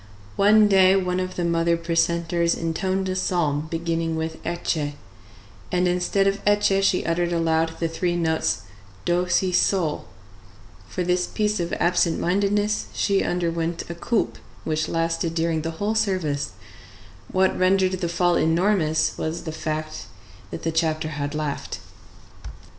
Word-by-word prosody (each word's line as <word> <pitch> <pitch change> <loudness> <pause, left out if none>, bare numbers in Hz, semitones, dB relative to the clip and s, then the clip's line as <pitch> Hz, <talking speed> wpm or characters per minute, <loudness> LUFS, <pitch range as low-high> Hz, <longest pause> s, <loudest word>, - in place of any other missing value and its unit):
One 210 +1 +5
day 190 -1 +5
one 180 -1 0
of 185 0 -3
the 175 - -1
mother 170 0 +2
precentors 170 0 +1
intoned 185 +3 -1
a 185 - -2
psalm 160 -5 0
beginning 165 0 -1
with 160 0 -4
Ecce, 160 -3 -2 0.8
and 180 0 +2
instead 180 +2 +1
of 195 0 0
Ecce 205 -1 +3
she 195 -1 +2
uttered 170 +1 0
aloud 165 -1 +1
the 165 - 0
three 175 +1 -1
notes 160 -11 0 0.4
do 175 +1 +1
si 185 0 +2
sol; 180 -3 +1 0.8
for 180 - -2
this 180 0 +1
piece 210 -1 -1
of 170 -1 -2
absent 175 -1 +2
mindedness 205 +3 +1
she 200 -1 +2
underwent 170 -1 -2
a - - -3
coulpe 215 +6 -1 0.2
which 155 0 -1
lasted 165 0 -1
during 165 -1 0
the 165 - -3
whole 205 +4 0
service: 185 -10 -1 0.8
what 190 0 +2
rendered 185 0 +3
the 185 -2 -2
fault 175 0 +2
enormous 165 -1 +2
was 160 +2 -3
the 160 - -4
fact 155 0 -4 0.4
that - - -7
the 165 - 0
chapter 160 -1 0
had 145 0 -4
laughed. 150 -2 -3
170 Hz, 145 wpm, -23 LUFS, 165-185 Hz, 0.8 s, One